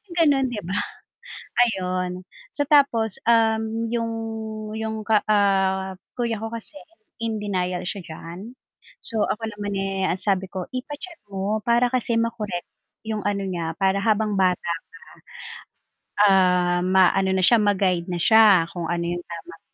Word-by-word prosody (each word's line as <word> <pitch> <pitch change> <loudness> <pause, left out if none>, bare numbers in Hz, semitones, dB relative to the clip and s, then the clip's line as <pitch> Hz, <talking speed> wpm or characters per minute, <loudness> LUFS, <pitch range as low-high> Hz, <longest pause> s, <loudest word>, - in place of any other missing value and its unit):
ganon 290 -6 +3
'di 240 -4 -4
ba 175 - -6 1.0
Ayun 185 -3 -3 0.2
so 290 - -1
tapos, 265 -8 +3
um, 225 0 +2
yung 230 -1 -1 0.7
yung 220 -1 -3
ka, 215 -1 +3
ah, 190 -2 +2 0.2
kuya 235 -3 -1
ko 225 - -4
kasi 230 +6 -8 0.4
in 225 -2 -3
denial 180 -3 -1
siya 195 +3 -4
diyan 175 +9 -9 0.5
so 225 -2 -2
ako 225 - -3
naman, 205 -1 -4
eh, 195 -1 -1
ang 175 - +1
sabi 190 -2 0
ko 185 -1 -5
ipa-check 295 +7 -7
mo 200 +2 -2
para 235 +2 +2
kasi 245 -2 0
ma-correct 225 -6 -2 0.4
yung 220 -1 -3
ano 200 -1 -1
niya 170 -4 -3
para 195 +1 +1
habang 210 -1 +1
bata 185 -1 +4 1.6
pa. 205 - +5
Ah, 180 -2 +4
ma-ano 190 +1 +3
na 185 -1 +3
siya 235 +1 +5
ma-guide 190 -4 +1
na 175 - -2
siya 205 -2 +6
kung 170 -2 -4
ano 170 0 -1
yung 175 +1 -2
tamang 170 -1 -10
200 Hz, 145 wpm, -23 LUFS, 185-225 Hz, 1.6 s, siya